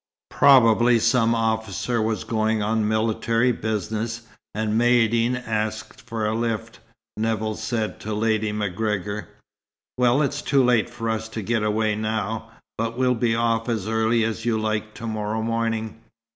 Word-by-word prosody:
"Probably 120 -3 +5
some 115 0 +3
officer 110 0 -1
was 110 -2 -1
going 110 -1 0
on 110 0 +1
military 115 +2 +1
business, 110 +1 -3 0.3
and 110 0 -1
Maïeddine's 120 +1 +2
asked 110 0 -3
for 115 -1 -4
a 105 - 0
lift," 115 0 -3 0.4
Nevill 110 0 -1
said 110 0 -3
to 110 0 -6
Lady 110 -1 0
MacGregor. 105 0 -2 0.7
"Well, 125 +4 +4
it's 145 +1 -2
too 140 -2 +2
late 120 -3 +3
for 115 -1 -5
us 110 0 -2
to 110 -1 -5
get 115 +2 0
away 105 0 +1
now; 110 +1 -3 0.3
but 115 +1 -2
we'll 125 -1 +3
be 115 -1 +1
off 115 0 0
as 110 -4 -2
early 110 +1 +2
as 115 0 -2
you 115 -1 +1
like 110 0 -2
to 115 - -7
morrow 110 0 -2
morning." 115 -1 -2
110 Hz, 150 wpm, -23 LUFS, 110-115 Hz, 0.7 s, Probably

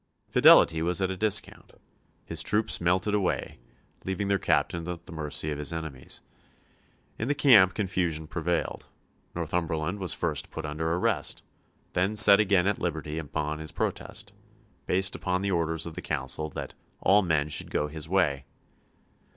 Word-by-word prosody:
Fidelity 80 -1 +6
was 85 +1 0
at 95 -1 0
a - - -3
discount. 105 +2 -1 0.5
His 80 -1 -1
troops 105 +3 +1
melted 95 +4 +1
away, 100 -10 -1 0.4
leaving 95 +1 -2
their 100 -1 +2
captain 80 +2 0
at 85 -1 -6
the - - -12
mercy 75 -1 -2
of 75 - -4
his 75 -2 -2
enemies. 80 -6 -6 1.0
In 115 - -2
the 145 - +1
camp 115 -10 +6
confusion 90 -6 -1
prevailed. 85 +2 -3 0.5
Northumberland 85 +2 -2
was 90 -5 0
first 80 -4 -2
put 80 - -6
under 80 +2 -2
arrest, 85 +2 -1 0.5
then 95 +4 0
set 100 -1 +8
again 95 -4 +3
at 100 - 0
liberty 80 -2 -3
upon 75 0 -3
his 80 0 -5
protest, 100 0 -4 0.5
based 95 +1 +1
upon 90 0 -2
the 100 - 0
orders 80 -2 0
of 85 - -7
the 90 - -7
Council 75 +1 -3
that - - -7 0.3
"all 100 +2 +5
men 80 -6 +1
should 75 - -3
go 75 - -1
his 80 +1 -7
way." 75 -8 +1
85 Hz, 160 wpm, -27 LUFS, 80-95 Hz, 1.0 s, set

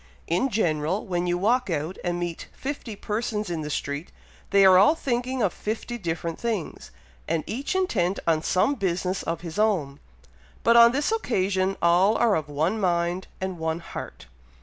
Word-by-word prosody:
In 180 +11 +1
general, 170 - 0
when 180 -2 -1
you 175 0 +1
walk 235 +5 +1
out 160 +2 -2
and 175 -1 -1
meet 175 -1 -4
fifty 265 -5 -5
persons 210 -1 -3
in 165 -2 -2
the 150 - -5
street, 145 +2 -4 0.4
they 200 -1 +5
are 190 -1 +8
all 210 +11 +6
thinking 255 -3 -1
of 190 - +1
fifty 230 +3 -4
different 165 -2 -3
things, 225 -7 -3 0.4
and 160 - 0
each 270 +10 -3
intent 200 - +1
on 160 -2 +2
some 185 - +2
business 185 -4 -1
of 165 0 -3
his 170 +1 -6
own, 170 -11 +1 0.6
but 235 - +5
on 235 0 +8
this 285 - 0
occasion 195 - 0
all 180 +5 +4
are 235 -3 +3
of 155 -2 -3
one 160 +9 0
mind 175 -1 0
and 190 -2 -4
one 160 0 -1
heart." 170 - -8
190 Hz, 170 wpm, -25 LUFS, 170-225 Hz, 0.6 s, are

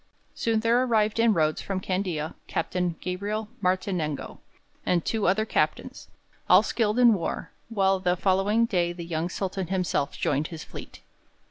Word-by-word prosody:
Soon 225 -1 0
there 230 +2 +3
arrived 220 -3 +1
in 230 0 +5
Rhodes, 155 -1 +1
from 195 -1 -3
Candia, 180 -5 -2
Captain 175 +1 -1
Gabriel 205 +4 -3
Martinengo 180 -5 -1 0.4
and 175 -2 +1
two 220 -4 0
other 205 +4 +2
captains, - - -1 0.4
all - - +7
skilled 220 -1 0
in 240 -2 +7
war, 180 -5 -3 0.2
while 195 -3 +2
the 180 -1 +1
following 200 +5 +2
day 175 -6 0
the 170 -1 -7
young 165 0 -2
Sultan 190 0 -3
himself 180 -6 -1
joined 145 +2 0
his 160 -3 -8
fleet. - - -10
190 Hz, 150 wpm, -26 LUFS, 175-215 Hz, 0.4 s, all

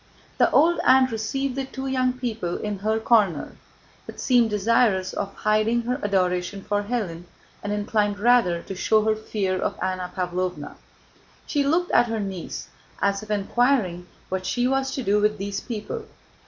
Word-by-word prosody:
The - - +5
old 340 +2 +4
aunt 260 -1 +5
received 255 +4 -2
the 270 -1 -2
two 265 0 -7
young 255 -1 +1
people 225 -8 -3
in 210 -2 -4
her 220 +2 0
corner, 210 -9 +2 0.5
but - - -9
seemed 245 -3 +3
desirous 210 -2 +2
of 195 - -3
hiding 215 +2 +1
her 250 +3 -2
adoration 185 0 0
for 205 0 0
Hélène 200 -6 -3 0.4
and 205 - -4
inclined 205 0 0
rather 205 -6 +3
to - - -6
show 215 +3 +2
her 220 0 +2
fear 200 -3 -2
of - - -2
Anna 185 -1 -3
Pávlovna. 180 -4 -3 0.7
She 290 -2 0
looked 335 +6 +1
at 240 - +4
her 225 -1 -2
niece, 195 -4 -5 0.3
as 200 0 +1
if 215 - -11
inquiring 205 -3 +1 0.2
what 185 0 -3
she 245 0 0
was 270 0 +1
to 265 - -3
do 205 0 +2
with 210 0 +2
these 200 0 -3
people. 215 -4 -5
210 Hz, 170 wpm, -24 LUFS, 190-245 Hz, 0.7 s, The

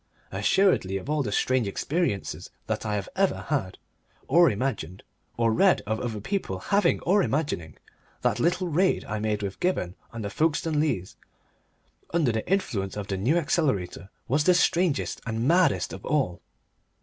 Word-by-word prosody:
Assuredly 180 - +2
of 130 +10 -5
all 150 -1 +1
the 110 -7 -2
strange 130 +1 +1
experiences 140 - -2 0.2
that - - -3
I 105 - 0
have 100 -2 -3
ever 195 0 +1
had, 125 -12 -1 0.5
or 170 +4 +6
imagined, 100 -6 -3 0.3
or 115 -1 +2
read 190 - +4
of 110 +1 -1
other 115 -4 -3
people 110 - -3
having 200 - +2
or 200 +3 +3
imagining, 140 - -2 0.4
that - - +1
little 180 +2 +1
raid 180 +4 +1
I 105 0 -3
made 105 -1 -1
with 100 -1 -5
Gibberne 135 - 0 0.2
on 115 -1 -6
the 100 - -4
Folkestone 155 +2 +1
Leas, 100 - -1 0.9
under 160 -7 +2
the 110 +9 -3
influence 105 - -1
of 105 -1 -5
the 95 - -1
New 125 - +2
Accelerator, 105 - -1 0.2
was 145 +4 +1
the 180 - +5
strangest 175 -3 +1
and 115 +2 -1
maddest 175 +2 +3
of - - -8
all. 135 - 0
130 Hz, 160 wpm, -26 LUFS, 100-170 Hz, 0.9 s, or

